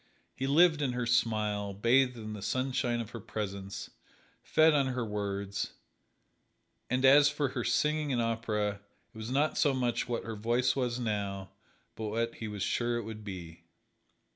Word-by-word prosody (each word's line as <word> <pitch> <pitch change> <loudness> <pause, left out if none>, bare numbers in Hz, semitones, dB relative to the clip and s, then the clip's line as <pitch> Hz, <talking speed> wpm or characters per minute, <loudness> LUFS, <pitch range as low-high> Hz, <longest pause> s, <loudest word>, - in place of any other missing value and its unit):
He 135 - -2
lived 160 +2 +5
in 135 -3 0
her 125 -1 -1
smile, 105 -4 +1
bathed 125 +4 +3
in 110 -1 -6
the 105 - -7
sunshine 125 0 0
of 115 -1 -8
her 115 - -6
presence, 100 -2 -5 0.5
fed 155 0 +4
on 140 -2 +3
her 125 -2 -2
words, 100 -1 -3 1.2
and 130 +2 +2
as 145 +2 +8
for 145 -2 -1
her 120 -1 -3
singing 150 +3 +1
in 125 -3 +1
opera 110 -3 -1 0.3
it - - -13
was 110 +1 -5
not 145 +4 +1
so 145 -2 +3
much 120 -2 -1
what 120 - -1
her 115 -1 -5
voice 120 +4 +1
was 125 -2 -1
now 100 -4 -3 0.4
but 110 - -5
what 115 +2 -1
he 110 - -6
was 105 -2 -4
sure 120 +2 0
it 120 - -3
would 110 0 -8
be. 90 -4 -8
115 Hz, 170 wpm, -31 LUFS, 105-130 Hz, 1.2 s, as